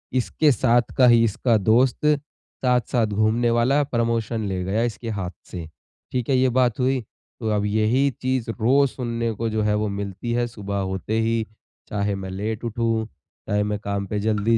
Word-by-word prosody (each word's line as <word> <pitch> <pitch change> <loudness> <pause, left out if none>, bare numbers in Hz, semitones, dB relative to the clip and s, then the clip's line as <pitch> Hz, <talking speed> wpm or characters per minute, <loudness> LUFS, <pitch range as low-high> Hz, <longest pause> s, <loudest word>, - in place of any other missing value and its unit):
इसके 130 +5 +2
साथ 120 -1 +2
का 130 -2 +7
ही 120 -1 +6
इसका 115 +1 +2
दोस्त 120 +7 +2 0.6
साथ-साथ 125 -1 +2
घूमने 110 +3 +1
वाला 125 +5 +3
प्रमोशन 115 -3 -1
ले 95 -2 -2
गया 100 +5 0
इसके 115 0 -3
हाथ 95 -5 -3 0.2
से। 85 -3 -5 0.5
ठीक 125 -1 -2
है? 135 - +4
ये 130 0 +3
बात 125 -1 +1
हुई। 130 0 +1 0.4
तो 110 -3 -2
अब 105 0 0
यही 110 +6 +2
चीज़ 130 -2 -1
रोज़ 135 +5 +4
सुनने 115 -2 -2
को 115 +2 -2
जो 110 0 -1
है 105 0 +2
वो 105 0 0
मिलती 100 +3 -4
है, 120 0 +1
सुबह 100 -4 -5
होते 105 +4 -2
ही। 115 0 0 0.4
चाहे 100 -1 -1
मैं 95 -1 -6
लेट 105 +4 -4
उठूँ, 115 -1 0 0.4
चाहे 105 0 +2
मैं 105 0 -2
काम 100 -1 -3
पे 105 +2 -2
जल्दी 110 +2 +2
115 Hz, 180 wpm, -23 LUFS, 105-120 Hz, 0.6 s, का